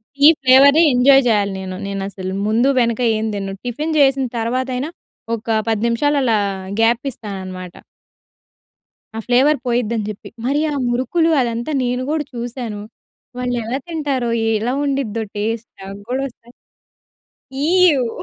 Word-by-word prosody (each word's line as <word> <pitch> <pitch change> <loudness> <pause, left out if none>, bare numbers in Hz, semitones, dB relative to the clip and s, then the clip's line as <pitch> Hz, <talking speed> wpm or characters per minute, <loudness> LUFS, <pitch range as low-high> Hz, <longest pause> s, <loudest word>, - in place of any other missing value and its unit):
Tea 285 +1 +6
ఫ్లేవరే 275 +4 +6
enjoy 270 +2 +6
చేయాలి. 205 -3 +2
నేను 185 -1 -6
నేను 195 0 -4
అసలు 190 -1 -6
ముందు 230 +5 +2
వెనక 235 0 +1 0.2
ఏం 220 - -2
తినను 195 -1 -4
టిఫిన్ 300 +6 -3
చేసిన 270 -1 +3
తర్వాతైనా 255 +4 -2 0.5
ఒక 220 0 -1
10 220 -2 0
నిమిషాలు 290 +5 +1
అలా 225 -3 +2 0.4
గ్యాప్ 230 +2 +3
ఇస్తాననమాట. 185 -5 -8 1.4
ఆ - - -2
ఫ్లేవర్ 265 +5 +3
పోయిద్దని 235 -3 0
చెప్పి. 210 - -8 0.2
మరి 285 +3 +1
ఆ - - -3
మురుకులు 260 +8 +1
అదంతా 235 +4 -2
నేను 250 +1 -1
కూడా 310 -1 0
చూశాను 235 -3 -5 0.6
వాళ్ళు 250 0 -2
ఎలా 235 +4 -2
తింటారో? 285 -7 -2 0.3
ఎలా 240 +4 -1
ఉండిద్దో 260 -6 -1
టేస్ట్? 225 +2 -3
నాకు 195 +1 -8
గూడా 260 +2 -1
ఒకసారి 240 -1 -17 1.0
ఈవ్! 300 -4 +3
240 Hz, 135 wpm, -19 LUFS, 220-270 Hz, 1.4 s, Tea